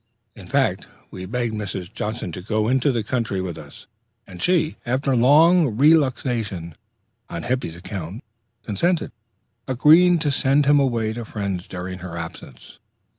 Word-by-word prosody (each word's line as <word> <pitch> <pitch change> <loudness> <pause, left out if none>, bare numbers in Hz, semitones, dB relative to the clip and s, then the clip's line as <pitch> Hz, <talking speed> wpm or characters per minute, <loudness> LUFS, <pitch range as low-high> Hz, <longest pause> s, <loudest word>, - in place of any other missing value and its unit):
In - - -12
fact, - - 0 0.2
we 95 0 -7
begged 120 +1 -2
Mrs. 105 -2 -5
Johnson 110 -5 -4
to 90 - -7
go 110 +2 -1
into 130 +3 +2
the 115 -3 -1
country 115 -4 -2
with 90 -3 -4
us, - - -12 0.4
and 90 -2 -11
she, 175 -3 +1
after 130 +2 0
long 145 +1 +5
reluctation 125 - +1 0.6
on 85 - -5
Hippy's 125 -10 -2
account, 95 - -7 0.4
consented, 170 - 0 0.6
agreeing 160 +7 +5
to 150 -2 0
send 140 +2 +2
him 145 +1 +5
away 115 -5 0
to 120 +1 -5
friends 100 -4 -4
during 90 0 -6
her 85 -1 -7
absence. 85 0 -10
115 Hz, 145 wpm, -22 LUFS, 95-140 Hz, 0.6 s, long